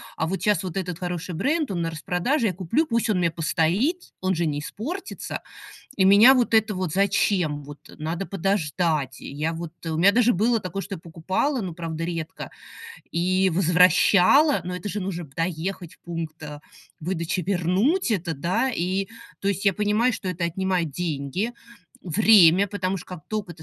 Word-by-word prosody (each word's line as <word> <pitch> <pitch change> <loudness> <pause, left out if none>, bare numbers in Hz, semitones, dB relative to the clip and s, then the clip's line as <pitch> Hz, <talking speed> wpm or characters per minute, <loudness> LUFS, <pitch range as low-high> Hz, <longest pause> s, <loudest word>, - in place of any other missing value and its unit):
а 160 - -1
вот 190 +4 -3
щас 205 -4 +2
вот 185 0 -5
этот 180 -3 -3
хороший 180 -1 -4
бренд, 290 - 0
он 175 -3 -2
на 165 0 -2
распродаже- 195 - 0
я 185 - -1
куплю, 205 - 0
пусть 230 -1 0
он 200 - +2
у - - +1
меня 170 -1 +2
постоит, 175 - 0
он 185 -1 +1
же 170 0 0
не 145 -1 -1
испортится. 290 - -6 0.6
И 190 - +3
меня 210 +7 +8
вот 245 -2 +1
это 220 -2 +3
вот- 185 -4 -3
зачем, 185 -6 +1
вот, 145 +1 -10 0.2
надо 165 +5 -3
подождать. 165 -7 -1
Я 155 +4 -3
вот, 165 -1 -6
у 160 -1 -2
меня 195 +5 +5
даже 245 -1 +3
было 225 +4 +2
такое, 195 +1 -5
что 200 0 -6
я - - -14
покупала, 185 - -2
ну, 180 - -4
правда, 165 0 -5
редко, 165 -2 -5 0.6
и 185 +3 +2
возвращала. 185 - +5
Но 180 +1 -4
это 180 +3 -5
же 210 - -3
нужно 185 -2 -4
доехать 165 +4 -4
в - - -30
пункт 165 -2 -6 0.6
выдачи, 170 +1 -2
вернуть 200 - +1
это, 170 -6 -1
да? 180 - 0
И, 190 -1 -1 0.3
то 195 - -4
есть 200 0 -1
я 200 - +5
понимаю, 210 +5 +1
что 195 - -6
это 180 -1 -4
отнимает 180 -2 -1
деньги, 165 - -3 0.5
время, 195 0 +5
потому 190 -1 -2
что - - -12
как 180 -3 -8
только 205 -6 -4
ты 155 - -14
185 Hz, 180 wpm, -24 LUFS, 165-205 Hz, 0.6 s, меня